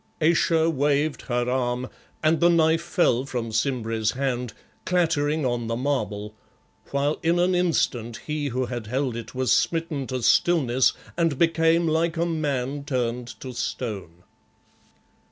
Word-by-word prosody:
Ayesha 165 0 +3
waved 145 0 +1
her 120 -1 0
arm 125 0 -1 0.4
and 155 +1 +3
the 175 - +5
knife 165 -1 +3
fell 170 -8 +1
from 125 -4 -4
Simbri's 110 -2 0
hand, 125 -3 -2 0.3
clattering 160 -4 +1
on 120 -2 -1
the 115 - -1
marble, 110 -6 -2 0.6
while 140 +2 0
in 170 +1 +2
an 180 +1 +2
instant 125 -10 0
he 150 -1 -2
who 130 0 -1
had 120 -3 -5
held 130 +1 -1
it 115 +2 -7
was 130 0 0
smitten 160 -5 0
to 130 -2 -3
stillness 130 -4 +3 0.2
and 165 -5 +1
became 165 +1 +3
like 165 +1 +1
a 170 - +1
man 145 -4 -2
turned 125 -3 -2
to 130 -1 -6
stone. 105 -8 -5
135 Hz, 140 wpm, -25 LUFS, 120-160 Hz, 0.6 s, the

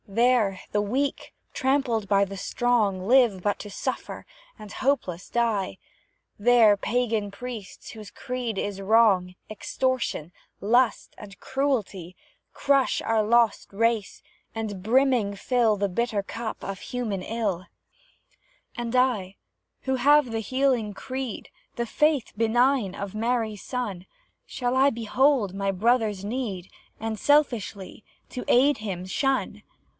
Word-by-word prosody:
There, 220 -2 +2
the 205 - +2
weak, 265 +7 -2 0.2
trampled 260 -6 0
by 200 -1 +4
the 195 0 -8
strong, 205 -3 0
Live 240 -6 +4
but 205 -1 0
to 205 - -8
suffer 200 - -5 0.3
hopeless 210 -4 -2
die; 225 -5 0 0.6
There 225 -1 +6
pagan 225 -1 -1
priests, 230 -2 -8
whose 215 -2 -10
creed 250 -4 -4
is 200 0 -3
Wrong, 195 -4 +3
Extortion, 215 - -2 0.3
Lust, 240 +4 +1
and 200 -1 -12
Cruelty, 210 -10 -2 0.3
Crush 275 -2 +1
our 225 -1 +1
lost 235 +1 +2
race 225 0 0 0.3
and 210 -4 -4
brimming 240 -3 +2
fill 225 0 +1
The 200 0 0
bitter 210 +1 -1
cup 225 +2 -6
of 195 -1 -5
human 230 -7 -4
ill; 200 -4 -3 1.1
And 240 0 -4
I 215 -7 +1 0.5
who 265 -1 0
have 285 0 +4
the 225 0 -2
healing 255 -3 0
creed, 260 +1 -6 0.3
The 235 - -2
faith 300 +1 +1
benign 230 -1 +2
of 200 0 -6
Mary's 225 -2 -1
Son, 210 -8 -4 0.4
Shall 245 0 -2
I 270 +2 +5
behold 235 -2 +1
my 195 0 -1
brother's 210 -1 +1
need, 205 -6 -4 0.3
And, 225 0 -3
selfishly, 230 -9 0 0.3
to 250 - -5
aid 280 +4 +4
him 190 -4 -5
shun? 270 +8 -1
225 Hz, 125 wpm, -25 LUFS, 200-250 Hz, 1.1 s, There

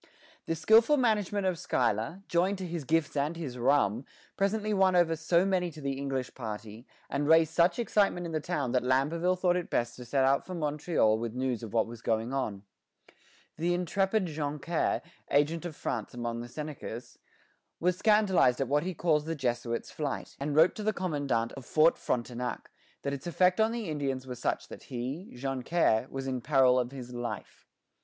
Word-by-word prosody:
The 165 - 0
skilful 225 - +5
management 210 -5 +1
of 180 -3 0
Schuyler, 120 - -1
joined 185 +4 +1
to 185 - -5
his 170 -4 -4
gifts 160 0 +1
and 145 +4 0
his 135 -7 -5
rum, 120 -3 +2 0.3
presently 210 +2 0
won 190 -2 +3
over 170 -2 +4
so 170 +3 +2
many 185 -2 +1
to 155 -1 -11
the 140 -2 -2
English 135 -2 -3
party, 110 0 -7 0.2
and 145 +1 -1
raised 160 0 +5
such 170 +1 +3
excitement 205 -6 +1
in 170 - -5
the 155 - 0
town 150 -6 -2
that 125 - +2
Lamberville 150 +8 +1
thought 180 -1 +2
it 180 -1 -2
best 120 0 -1
to 125 - -9
set 135 +3 +1
out 135 +1 +3
for 185 - -7
Montreal 150 -8 +1
with 115 0 -4
news 125 -3 -1
of 115 -3 -7
what 115 -1 +2
was 115 0 -10
going 115 +3 -1
on. 105 -7 -2 0.9
The 175 +2 +1
intrepid 195 +3 +1
Joncaire, 150 +1 -1 0.3
agent 150 +4 +2
of 165 -3 -5
France 115 -4 -4
among 120 -1 -3
the 120 - -8
Senecas, 140 -4 -7 0.6
was 180 +1 +2
scandalized 195 - +3
at 135 - 0
what 145 +3 +2
he 180 +2 -4
calls 155 -2 +1
the 165 +1 -2
Jesuit's 120 -4 -2
flight, 145 -3 -4
and 145 +1 -2
wrote 160 +3 +6
to - - -4
the 215 +1 +1
commandant 145 -10 -1
of 135 - -9
Fort 155 +5 +4
Frontenac 125 0 -3 0.3
that 140 - -2
its 140 +5 -6
effect 180 +4 +3
on 220 +1 +3
the 230 -3 -4
Indians 135 -4 -2
was 125 -2 -7
such - - -1
that - - -10
he, 135 +8 -5
Joncaire, 130 -1 +1
was 135 0 -5
in 130 -2 -2
peril 130 -1 +4
of 125 0 -2
his 125 -2 -8
life. 120 -1 -6
150 Hz, 190 wpm, -30 LUFS, 125-175 Hz, 0.9 s, wrote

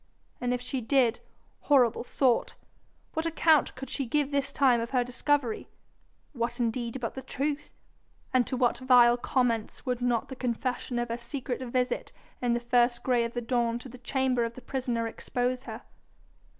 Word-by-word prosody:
And 245 0 0
if 250 0 -1
she 255 +1 -3
did 245 -1 +2 0.4
horrible 255 -7 +3
thought! 250 -1 +1 0.6
what 320 +1 -1
account 320 -2 +3
could 270 +1 -7
she 275 -3 -2
give 290 +3 +1
this 280 -1 0
time 255 -4 +4
of 230 - -3
her 250 -2 +2
discovery? 250 -1 -1 0.6
What 240 -1 -2
indeed 235 +1 -1
but 230 -2 -3
the 265 - -6
truth? 285 +3 -3 0.6
And 255 -2 +3
to 255 - -2
what 245 -1 +2
vile 245 -2 +6
comments 240 -2 -1
would 250 -2 -1
not 240 -2 +1
the 265 - -6
confession 250 0 -2
of 240 0 -1
her 230 - -2
secret 250 +1 -4
visit 250 0 -1 0.3
in 245 -1 +2
the 240 - +1
first 240 0 +2
grey 245 -2 +2
of 230 - -5
the 240 - -1
dawn 235 -1 0
to 250 +2 -9
the 250 +1 -12
chamber 255 -1 +1
of 230 0 -3
the 255 - -9
prisoner 245 -4 -2
expose 250 +2 -2
her? - - -7
250 Hz, 175 wpm, -28 LUFS, 240-265 Hz, 0.6 s, vile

